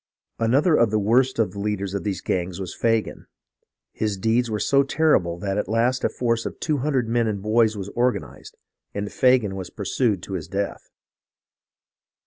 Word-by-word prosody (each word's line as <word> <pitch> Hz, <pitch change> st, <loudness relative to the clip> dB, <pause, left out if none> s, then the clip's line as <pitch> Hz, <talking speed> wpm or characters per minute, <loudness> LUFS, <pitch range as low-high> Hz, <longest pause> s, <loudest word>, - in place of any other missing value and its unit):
" -, -, -55 dB
Another 145 Hz, +7 st, +3 dB
of 115 Hz, -5 st, +4 dB
the 110 Hz, -, +1 dB
worst 120 Hz, +6 st, +2 dB
of 110 Hz, -5 st, +1 dB
the 100 Hz, -, -8 dB
leaders 100 Hz, -2 st, -2 dB
of 100 Hz, -3 st, -3 dB
these 100 Hz, -2 st, -3 dB
gangs 90 Hz, 0 st, -2 dB
was 95 Hz, -3 st, -5 dB
Faaan. 115 Hz, -2 st, -1 dB, 0.6 s
His 105 Hz, -2 st, -2 dB
deeds 115 Hz, +4 st, +1 dB
were 105 Hz, -1 st, -2 dB
so 140 Hz, +6 st, +3 dB
terrible 135 Hz, -, +2 dB
that 100 Hz, +2 st, -2 dB
at -, -, -3 dB
last 120 Hz, +3 st, +1 dB
a -, -, +2 dB
force 115 Hz, -2 st, -1 dB
of -, -, -9 dB
two 150 Hz, -3 st, 0 dB
hundred 130 Hz, -3 st, 0 dB
men 115 Hz, 0 st, +1 dB
and 105 Hz, -2 st, -2 dB
boys 110 Hz, +1 st, +2 dB
was 100 Hz, 0 st, -5 dB
organized, 125 Hz, +3 st, -2 dB, 0.4 s
and 100 Hz, 0 st, -3 dB
Fagan 125 Hz, -6 st, +3 dB
was 95 Hz, -2 st, -6 dB
pursued 100 Hz, -1 st, -1 dB
to 95 Hz, -, -7 dB
his 85 Hz, -4 st, -4 dB
death. 100 Hz, +3 st, -4 dB
110 Hz, 185 wpm, -23 LUFS, 100-120 Hz, 0.6 s, of